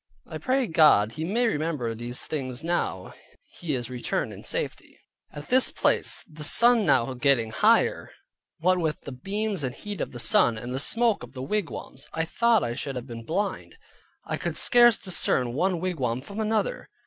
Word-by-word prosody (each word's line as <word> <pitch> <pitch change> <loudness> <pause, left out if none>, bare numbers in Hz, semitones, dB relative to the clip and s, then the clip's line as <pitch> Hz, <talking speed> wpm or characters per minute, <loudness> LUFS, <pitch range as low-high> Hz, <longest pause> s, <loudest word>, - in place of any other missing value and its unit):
I - - -7
pray 260 0 0
God 150 - +4
he 155 - -6
may 220 +9 0
remember 150 - -2
these 120 +2 -4
things 130 -2 -4
now 165 - -3 0.4
he 160 -5 -4
is 120 -1 -5
returned 125 -1 -3
in - - -11
safety. - - -5 0.3
At 145 0 -10
this 255 +1 +5
place - - +1
(the 155 -1 -10
sun 235 +6 +7
now 130 0 +2
getting 125 -3 +1
higher) - - +2 0.5
what 185 +3 +1
with 160 -3 -2
the 140 - -9
beams 195 +6 -4
and 125 0 -4
heat 205 +3 -7
of - - -4
the 120 - -9
sun, 115 -1 +3
and 120 +3 -6
the 130 - -3
smoke 230 +8 +1
of 125 +1 -11
the 130 -1 -7
wigwams, 165 -6 -5
I 165 0 -2
thought 235 +5 +1
I 120 - -3
should 135 +2 -5
have 125 -1 -6
been 115 -3 -9
blind. 200 - -4 0.5
I - - -4
could - - -4
scarce 240 -2 +5
discern 130 -9 +1
one 180 +5 -1
wigwam 135 -10 -3
from 200 +9 -9
another. 220 - -2
155 Hz, 185 wpm, -25 LUFS, 125-205 Hz, 0.5 s, sun